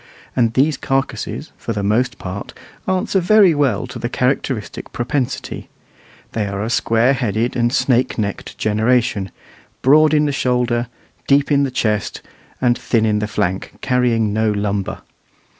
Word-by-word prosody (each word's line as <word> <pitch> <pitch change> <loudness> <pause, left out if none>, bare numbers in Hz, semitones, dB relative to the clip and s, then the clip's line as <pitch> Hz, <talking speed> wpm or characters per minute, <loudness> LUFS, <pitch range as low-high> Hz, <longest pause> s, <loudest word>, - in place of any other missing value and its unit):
And 115 -3 +2
these 140 +2 +3
carcasses, 135 0 -2
for 115 - -4
the 100 -1 -3
most 115 +5 +1
part, 95 +2 -7 0.3
answer 185 +1 +1
very 190 0 +5
well 145 -3 +1
to - - -8
the 120 - -3
characteristic 125 -3 -2
propensity: 125 +2 -3 0.6
they 105 -2 -2
are 100 0 -3
a 110 - -2
squareheaded 115 -1 +1
and 120 -1 +1
snake 125 -1 +1
necked 100 -3 -4
generation, 110 -2 +1 0.5
broad 155 +3 +5
in 150 0 +3
the 145 - 0
shoulder, 125 -3 0 0.4
deep 140 +1 +3
in 140 -1 +4
the 140 - +1
chest, 110 -6 -1 0.4
and 120 -2 +3
thin 115 -2 0
in 105 -1 +1
the 105 - -2
flank, 95 -2 -2
carrying 120 -5 +1
no 110 0 +1
lumber. 100 -1 -2
120 Hz, 145 wpm, -19 LUFS, 105-135 Hz, 0.6 s, very